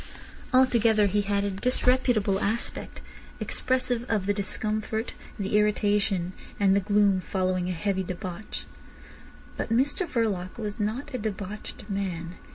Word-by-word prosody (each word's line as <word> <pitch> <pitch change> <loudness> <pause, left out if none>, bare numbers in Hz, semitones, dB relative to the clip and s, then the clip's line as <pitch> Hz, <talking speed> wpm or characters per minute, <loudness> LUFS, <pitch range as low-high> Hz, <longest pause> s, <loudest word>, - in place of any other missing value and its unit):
Altogether 230 -4 +5
he 205 +1 +2
had 200 0 0
a 200 - 0
disreputable 245 -2 +2
aspect, 220 +4 -2 0.4
expressive 255 -2 0
of 210 -4 +1
the 205 - +2
discomfort, 215 +2 -2 0.2
the 200 -1 -1
irritation 205 -3 +1 0.3
and 195 -1 +5
the - - +5
gloom 205 -1 +3
following 185 -1 0
a - - 0
heavy 190 +3 0
debauch. 185 +2 -5 0.9
But - - -2
Mr 285 +10 +2
Verloc 205 - -1
was 210 -1 -4
not 220 +7 -2
a 255 - -2
debauched 210 0 -5
man. 180 -4 -3
205 Hz, 130 wpm, -27 LUFS, 195-225 Hz, 0.9 s, Altogether